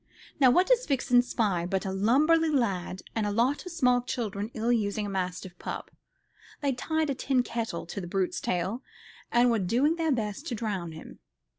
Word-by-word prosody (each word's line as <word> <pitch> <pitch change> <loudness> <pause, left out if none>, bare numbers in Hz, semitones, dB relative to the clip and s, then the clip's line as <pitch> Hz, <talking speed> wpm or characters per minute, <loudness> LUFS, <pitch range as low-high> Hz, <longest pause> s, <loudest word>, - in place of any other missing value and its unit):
Now 265 -3 +7
what 360 +9 +4
does - - +2
Vixen 250 -3 +3
spy 200 -8 0
but 190 +2 -1
a 190 - -2
lubberly 295 +12 +3
lad 195 -10 -1
and 220 -2 0
a - - -1
lot 250 - +1
of - - -6
small 250 -7 +3
children 215 -4 -3
ill 230 +2 0
using 210 -2 0
a - - -4
mastiff 185 -1 -3
pup. - - -6 0.7
They'd 275 -4 -1
tied 315 0 0
a - - +1
tin 260 -1 +1
kettle 230 -9 -4
to 195 +4 -6
the 175 - -6
brute's 185 0 -1
tail, 185 +7 -1 0.5
and 240 0 +4
were 230 - +2
doing 250 - +2
their 325 -2 +1
best 225 +4 -2
to 240 - -2
drown 195 -7 -3
him. 160 - -11
230 Hz, 190 wpm, -28 LUFS, 195-270 Hz, 0.7 s, Now